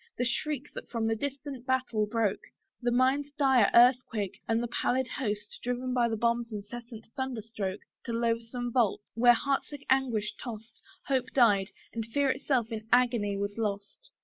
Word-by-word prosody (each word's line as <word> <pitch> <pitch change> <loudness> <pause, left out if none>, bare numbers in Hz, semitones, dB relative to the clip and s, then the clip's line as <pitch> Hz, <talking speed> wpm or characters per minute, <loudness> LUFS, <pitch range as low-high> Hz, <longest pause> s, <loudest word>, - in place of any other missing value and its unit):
The 245 - 0
shriek 285 +3 -2
that - - -8
from 230 -2 -1
the 225 0 +1
distant 275 0 -5
battle 255 -5 +1
broke! 210 -2 0 0.4
The 240 - +1
mine's 260 +4 +2
dire 265 -7 +4
earthquake, 235 -5 +4
and 225 +1 +1
the - - -1
pallid 250 +2 0
host 210 -6 -4
Driven 250 +1 -2
by 240 -2 +2
the 225 - -1
bomb's 235 +1 0
incessant 225 +2 -8
thunder 260 -5 -3
stroke 205 -3 -4 0.2
To 235 - -3
loathsome 230 +1 -1
vaults, 225 -4 +1
where 240 +1 +6
heart 275 +3 0
sick 290 -1 -10
anguish 240 -6 +1
toss'd, 225 -2 -9 0.2
Hope 260 -2 0
died, 205 -6 +4 0.2
and 230 - -2
fear 265 +5 +1
itself 255 -4 0
in 220 -1 -5
agony 235 -5 +3
was 200 +2 -3
lost! 205 - -4
235 Hz, 170 wpm, -29 LUFS, 220-260 Hz, 0.4 s, where